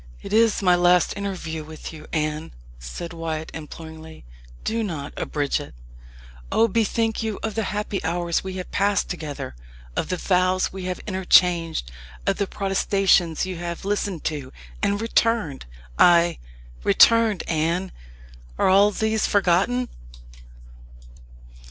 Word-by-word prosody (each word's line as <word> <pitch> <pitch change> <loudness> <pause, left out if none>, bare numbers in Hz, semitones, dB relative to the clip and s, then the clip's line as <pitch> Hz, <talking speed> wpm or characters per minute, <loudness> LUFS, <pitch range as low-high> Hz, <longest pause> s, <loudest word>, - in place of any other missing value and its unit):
"It - - -6
is 225 -2 +3
my 180 -1 +5
last 175 0 +4
interview 185 -6 -4
with 155 +1 -9
you, 155 - -11
Anne," 155 - -2 0.3
said 60 - -7
Wyat 160 -1 -4
imploringly; 160 - -10 0.4
"do 230 +1 -1
not 155 -9 -4
abridge 145 -2 -1
it. - - -10 0.8
Oh, 225 - +4
bethink 225 +1 0
you 220 -2 -2
of 220 - -2
the 220 -1 -1
happy 210 -1 -3
hours 170 0 -1
we 190 0 -5
have 185 -1 -6
passed 205 0 +1
together 150 - -6 0.4
of - - -2
the 180 - -1
vows 185 +1 +1
we 190 -1 -6
have 185 0 -2
interchanged 175 - +3 0.3
of - - +1
the 200 - 0
protestations 195 -4 +2
you 185 -2 -5
have 170 +1 -5
listened 200 -4 -2
to, 145 -4 -3 0.3
and 200 0 +1
returned 225 - 0 0.3
ay, 170 -1 +5 0.4
returned, 230 -4 +5
Anne. 170 +4 0 0.7
Are - - +3
all 200 +2 +6
these 220 +1 0
forgotten?" 205 +6 +2
180 Hz, 135 wpm, -23 LUFS, 160-205 Hz, 0.8 s, all